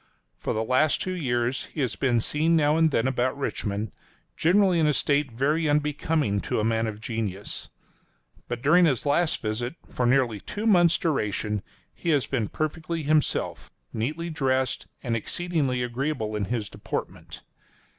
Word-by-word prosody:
For - - -2
the 110 - 0
last 130 +6 +2
two 185 - -2
years 125 -5 -1
he 155 - -5
has 130 - -1
been 125 -4 +2
seen 155 +8 +2
now 150 -1 +3
and 160 0 +4
then 125 -4 +1
about 130 +1 0
Richmond, 105 -6 -2 0.4
generally 185 +1 +4
in 155 - +3
a 150 - +2
state 145 -2 +1
very 150 +7 +1
unbecoming 150 -6 +1
to - - -1
a - - 0
man 115 0 +1
of 105 -1 -5
genius. 110 -3 -4 0.8
But 120 0 -4
during 175 +5 +6
his 135 -6 +1
last 155 +1 +1
visit, 120 +6 -2 0.2
for 125 - 0
nearly 120 -4 +2
two 210 - -5
months' 175 -6 +5
duration, 105 - -1 0.3
he 170 - -4
has 145 -5 +3
been 120 -6 -1
perfectly 160 +1 -3
himself, 150 +1 0 0.2
neatly 155 +9 -2
dressed, 130 -4 0 0.2
and 115 -2 0
exceedingly 140 -1 0
agreeable 125 -3 -2
in 105 -1 -1
his 115 -1 -2
deportment. - - -6
135 Hz, 160 wpm, -26 LUFS, 115-155 Hz, 0.8 s, during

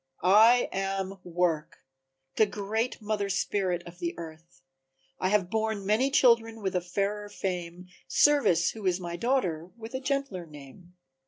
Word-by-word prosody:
"I 220 +6 +6
am 195 0 -3
Work, 170 -3 -2 0.5
the 215 - +4
great 215 +4 -2
Mother 205 -1 -1
Spirit 190 -2 -1
of 175 +1 -12
the 170 -1 -3
earth. 160 -4 -11 0.6
I 185 - +1
have 195 -3 +1
borne 220 -2 -1
many 220 +7 +2
children 230 -4 +3
with 190 -1 -2
a 180 - +1
fairer 200 +3 -2
fame, 180 -2 -5 0.2
Service, 220 - +4
who 215 -4 -5
is 180 0 +1
my 170 -1 -5
daughter 180 -7 -1
with 225 +1 -9
a 260 - -2
gentler 265 -10 -2
name." 150 +4 -14
195 Hz, 150 wpm, -28 LUFS, 175-220 Hz, 0.6 s, I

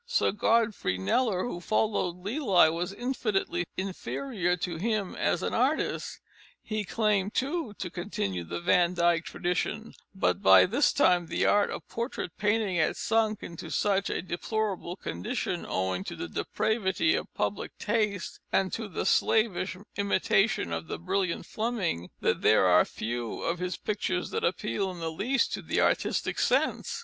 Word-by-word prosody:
Sir 485 - +2
Godfrey 215 - +1
Kneller, 185 - +1
who 175 -8 -4
followed 210 -4 0
Lely, 200 - +4
was 175 +3 -2
infinitely 200 -7 -1
inferior 190 0 -2
to 175 -1 -3
him 210 0 -1
as - - 0
an - - -1
artist. - - 0 0.4
He 215 -1 -2
claimed, 210 -1 0
too, 275 -5 -1
to 180 - -5
continue 100 - -3
the 85 +1 -5
Van 175 - +3
Dyck 170 -1 +2
tradition, 180 +5 -2 0.2
but 190 - +1
by - - +8
this 245 +10 +3
time 180 -10 +3
the 170 - 0
art 205 0 +4
of - - -6
portrait 235 -7 -4
painting 210 -3 +1
had 160 -1 +1
sunk 220 -1 +1
into 170 - -7
such 200 -1 +1
a - - -2
deplorable 185 0 -2
condition, 85 - -3
owing 95 0 -1
to - - -5
the - - -5
depravity 220 - 0
of - - -2
public - - -3
taste 210 -3 -1
and 190 -1 +1
to 225 -2 -3
the 195 - -3
slavish 205 -4 +2 0.2
imitation 200 - +2
of 80 0 -4
the - - -4
brilliant 180 - -1
Fleming, 215 - -2
that - - +1
there 110 - +5
are 90 0 +6
few 120 0 -4
of 170 +1 -1
his 180 -1 -2
pictures 190 -4 -2
that - - -2
appeal 195 +2 -1
in 180 - -7
the 165 -1 -3
least 245 +11 0
to - - -3
the - - -1
artistic - - +1
sense. - - +1
195 Hz, 160 wpm, -28 LUFS, 170-215 Hz, 0.4 s, by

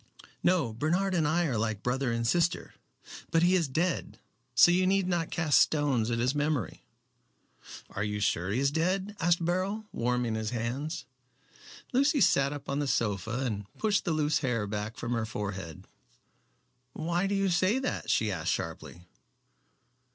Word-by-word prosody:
"No. 165 -11 +2
Bernard 175 - 0
and 160 -4 +2
I 170 +3 +2
are 125 -8 -1
like 110 -2 -2
brother 125 0 0
and 115 0 -1
sister. 170 +7 +1 0.6
But 165 0 +3
he 180 +1 +4
is 175 -5 +2
dead, 165 +6 -1 0.4
so 175 - +7
you 185 +1 +3
need 195 -1 +2
not 170 -3 0
cast 160 -4 +3
stones 140 -7 +2
at 115 - 0
his 125 +3 +1
memory." 145 -3 -2 1.1
"Are - - -3
you 105 0 -2
sure 95 -3 0
he 110 +6 0
is 140 +1 +2
dead?" 185 +6 -1
asked 170 0 +2
Beryl, 190 +5 -1
warming 120 -1 -1
his 110 -1 -2
hands. 125 +7 -3 0.9
Lucy 280 +3 +3
sat 140 - +4
up 145 -1 -7
on 140 +1 -1
the 145 - -1
sofa 110 -1 -1
and 105 -4 -4
pushed 210 -2 +1
the 175 - -1
loose 155 -1 +1
hair 120 -6 -1
back 105 +2 -4
from 120 - -4
her 115 -2 0
forehead. 100 -7 -5 1.1
"Why 175 +4 -1
do 200 - 0
you 195 -1 +1
say 185 +6 +2
that?" 265 -1 -3
she 110 -1 +2
asked 85 -5 -1
sharply. 85 - -5
145 Hz, 165 wpm, -29 LUFS, 115-175 Hz, 1.1 s, so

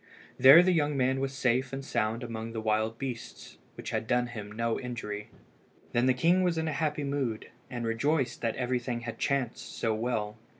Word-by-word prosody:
There 135 +7 +10
the 185 - +3
young 150 -4 +1
man 130 0 +2
was 135 0 -1
safe 130 -1 0
and 135 0 -5
sound 110 -1 -1
among 115 -1 -5
the 115 - -3
wild 110 +1 0
beasts, 125 -3 -7 0.2
which - - -6
had 110 - -2
done 125 +1 +2
him 110 -4 -7
no 115 +1 -1
injury. 105 -4 -5 0.6
Then 120 +2 +2
the 130 - +4
king 170 +8 +3
was 175 -2 +1
in 160 0 -1
a 155 - -1
happy 150 +1 -1
mood, 135 -6 -2 0.2
and 120 -2 -4
rejoiced 130 +4 0
that 115 -2 -1
everything 125 -1 -2
had 115 -1 -6
chanced 140 -5 -2
so 115 -1 0
well. 110 -1 -2
125 Hz, 195 wpm, -29 LUFS, 115-135 Hz, 0.6 s, There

